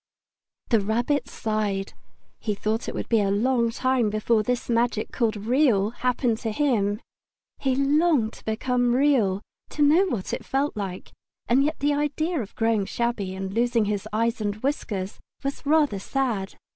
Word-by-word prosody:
The 230 - +4
Rabbit 240 +6 0
sighed. 210 -3 -2 0.5
He 210 -2 -2
thought 215 +3 -2
it - - -6
would - - -3
be 225 -2 +3
a 200 - +1
long 235 +3 +2
time 250 -1 +1
before 215 +1 +2
this 245 +3 -2
magic 235 -2 0
called 230 -3 0
Real 220 -2 +2
happened 245 -1 0
to 225 - -2
him. 215 -5 +1 0.6
He 265 -2 +1
longed 275 -3 +2
to - - -15
become 245 +2 +1
Real, 240 -8 +2 0.3
to 295 - 0
know 325 +7 +5
what 225 - -3
it - - -3
felt 275 +2 -1
like; 195 -3 -5 0.4
and 260 +3 +4
yet 305 +2 0
the 290 +1 +2
idea 295 +2 0
of 205 - -9
growing 225 -3 +1
shabby 230 -6 -2
and 190 0 -5
losing 235 0 +2
his 205 0 -2
eyes 230 +2 0
and 205 -1 -1
whiskers 205 -8 -2 0.2
was 275 +1 -4
rather 295 -9 +3
sad. 220 -4 -2
235 Hz, 165 wpm, -25 LUFS, 210-270 Hz, 0.6 s, know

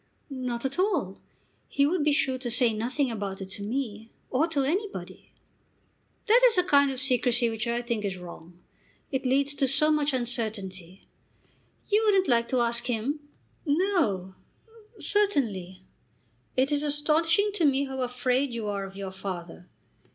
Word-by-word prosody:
"Not 250 -2 -4
at 270 +6 -3
all. 350 - 0 0.5
He 280 - +2
would 320 +1 +1
be 300 - +3
sure 270 -4 +1
to 250 -1 -4
say 240 -1 +2
nothing 250 +5 -1
about 200 -3 -4
it 190 -1 -7
to 195 - -6
me, 225 -1 -4 0.2
or 290 +6 +2
to 295 -5 0
anybody." 390 +9 -4 0.9
"That 465 +4 +5
is 445 - -6
a 360 - +4
kind 285 -5 +4
of 265 -2 -4
secrecy 245 -2 +2
which 225 +1 -3
I 235 +1 -1
think 235 -3 -2 0.2
wrong. 175 -1 -11 0.5
It 265 -1 -1
leads 275 +2 +2
to 275 -1 +1
so 290 +4 +3
much 300 -1 +2
uncertainty. 210 -8 -3 0.8
You 420 +1 +3
wouldn't 390 -3 +4
like 235 -2 +3
to 255 -2 +2
ask 235 0 -1
him?" 250 +5 -1 0.4
"No; 290 - +1 0.6
certainly." 215 - +1 0.7
"It 265 +3 +2
is 290 -1 +2
astonishing 315 +7 +2
to 350 -6 +1
me 280 0 +3
how 265 -1 -5
afraid 250 +1 0
you 225 -2 -3
are 200 -1 -2
of 195 0 -9
your 195 -1 -5
father. 180 -2 -7
255 Hz, 160 wpm, -27 LUFS, 215-295 Hz, 0.9 s, That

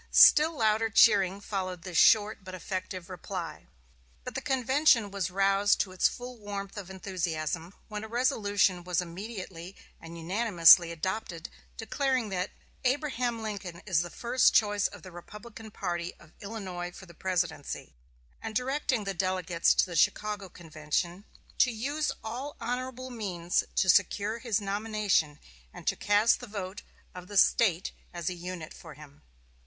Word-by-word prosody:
Still 310 +1 +7
louder 220 0 +2
cheering 200 -3 +5
followed 185 -4 -4
this 185 -3 -7
short, 215 -1 +4
but 185 -1 -8
effective 185 -1 -5
reply. 180 -3 -6 0.6
But - - -6
the - - -3
convention 265 -4 +3
was 195 -3 -2
roused 195 +2 +3
to 190 - -3
its 185 - +3
full 245 -1 -8
warmth 200 -1 -6
of 200 -3 -7
enthusiasm 175 -2 -3
when 210 -1 -5
a - - -6
resolution 205 -7 +1
was 180 -1 0
immediately 185 0 -7 0.2
and 165 0 -10
unanimously 175 -2 +5
adopted 170 0 -4 0.3
declaring 255 0 -1
that 185 0 -2 0.3
"Abraham 255 -4 0
Lincoln 195 -5 -6
is 185 -5 +2
the 175 - -5
first 245 +7 +2
choice 205 -1 +3
of - - -13
the 185 - -10
Republican 210 +5 -11
party 175 -4 -4
of 155 0 -19
Illinois 190 -4 -5
for 190 - -12
the 170 - -15
Presidency," 175 -4 -3 0.5
and 220 -1 -6
directing 260 -1 0
the 195 -1 -3
delegates 180 -2 +1
to - - +4
the 175 - -7
Chicago 205 +4 +1
convention 170 +3 -3 0.3
"to 255 - +6
use 280 +7 -2
all 255 +6 -5
honorable 255 +2 -4
means 180 -7 -1
to 190 - +2
secure 210 +4 +3
his 230 -3 0
nomination, 205 -6 0 0.3
and - - -12
to - - +1
cast 205 +3 +3
the 245 - -9
vote 200 -2 -6 0.3
of 180 0 -10
the 205 - -4
State 190 -3 +3 0.2
as 175 0 -3
a - - -3
unit 175 -2 -7
for 160 -3 -12
him." 150 0 -15
195 Hz, 150 wpm, -29 LUFS, 175-225 Hz, 0.6 s, Still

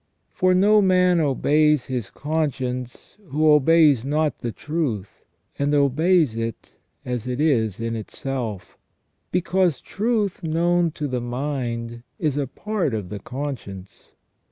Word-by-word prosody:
For 185 0 +2
no 210 +3 +5
man 180 -2 +4
obeys 150 -1 +2
his 125 -5 -4
conscience 130 - -3
who 155 +1 +3
obeys 150 -3 +5
not 150 0 0
the 120 - -3
truth, 140 - -4 0.4
and 140 +1 +1
obeys 145 0 +3
it 115 -1 -5 0.3
as 125 -1 -3
it 125 +1 -3
is 115 - +1
in 115 0 -2
itself; 110 -4 -5 0.5
because 180 -4 +1
truth 210 -2 -1
known 170 +1 +1
to 150 - -3
the 125 -2 -2
mind 120 -2 -4 0.2
is 150 -4 -1
a 145 -2 -1
part 185 - -2
of 100 -5 -5
the 105 - -6
conscience. 120 -7 -7
145 Hz, 130 wpm, -23 LUFS, 120-165 Hz, 0.5 s, no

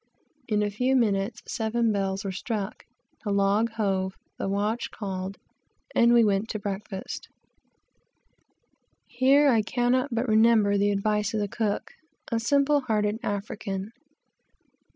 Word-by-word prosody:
In 210 -2 +1
a 205 - -1
few 250 +6 +1
minutes 205 -3 +1
seven 230 -1 0
bells 195 -1 -1
were 195 - -2
struck, 205 +1 -4 0.4
the 210 - -3
log 200 +3 +2
hove, 190 -4 -1 0.2
the - - -2
watch 210 +4 -1
called, 190 -1 -5 0.6
and 235 0 +5
we 240 -1 +6
went 205 +1 +1
to - - -2
breakfast. 200 -1 -5 1.8
Here 270 +4 +4
I 230 -4 +4
cannot 245 +4 +1
but 235 +2 -1
remember 220 -2 +4
the 200 +1 +2
advice 210 +1 0
of - - +1
the 205 - 0
cook, 210 0 -2 0.4
a 230 - +1
simple 280 +4 +3
hearted 215 -3 0
African. 200 -2 -4
210 Hz, 130 wpm, -26 LUFS, 200-235 Hz, 1.8 s, we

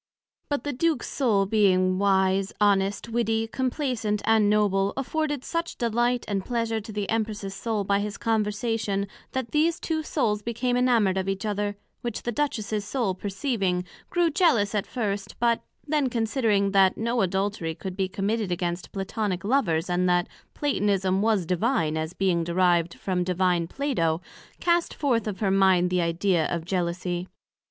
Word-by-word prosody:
But 285 -1 -1
the 290 - -2
Duke's 320 +4 0
Soul 215 -8 +2
being 185 -3 +3
wise, 190 -1 +2
honest, 200 +1 +2
witty, 225 -1 0
complaisant 250 -4 -1
and 220 -2 +4
noble, 200 -2 +2
afforded 295 0 -1
such 335 0 -3
delight 240 +1 +1
and 195 -2 -1
pleasure 230 -1 -1
to 215 - -9
the 205 -1 -3
Empress's 215 -3 -2
Soul 215 0 -2
by 200 0 +1
his 205 0 -3
conversation, 215 -2 -1 0.3
that 260 -2 -3
these 325 +3 +2
two 320 -1 -1
souls 225 -9 0
became 235 +3 -1
enamoured 230 -7 +3
of 190 +1 -2
each 195 +1 -2
other; 205 -1 -1 0.3
which 240 -3 -4
the 240 - -1
Duchess's 215 -6 -1
soul 215 -2 -1
perceiving, 195 -2 -1 0.2
grew 345 -2 +2
jealous 270 - +3
at 205 -2 -1
first, 205 -4 -3
but 235 -1 +2 0.3
then 295 -3 +1
considering 225 -4 +1
that 195 -1 +4
no 235 +1 0
Adultery 190 -3 -1
could 190 +1 -6
be 190 -1 0
committed 200 +1 -1
amongst 175 0 -3
Platonick 195 -1 -2
Lovers, 195 -9 +1
and 180 0 +1
that 175 0 +2 0.3
Platonism, 195 -9 +1
was 215 -4 +2
Divine, 175 - +1
as 160 +1 -3
being 185 -3 +1
derived 170 -1 +2
from 185 -2 -1
Divine 180 -1 +1
Plato, 170 - 0 0.4
cast 345 -1 +1
forth 240 -7 0
of 205 -1 -4
her 195 -3 +2
mind 190 -2 +4
that 180 -1 +2
Idea 170 0 +1
of 170 -2 -3
Jealousie. 175 0 -2
205 Hz, 160 wpm, -26 LUFS, 190-235 Hz, 0.4 s, and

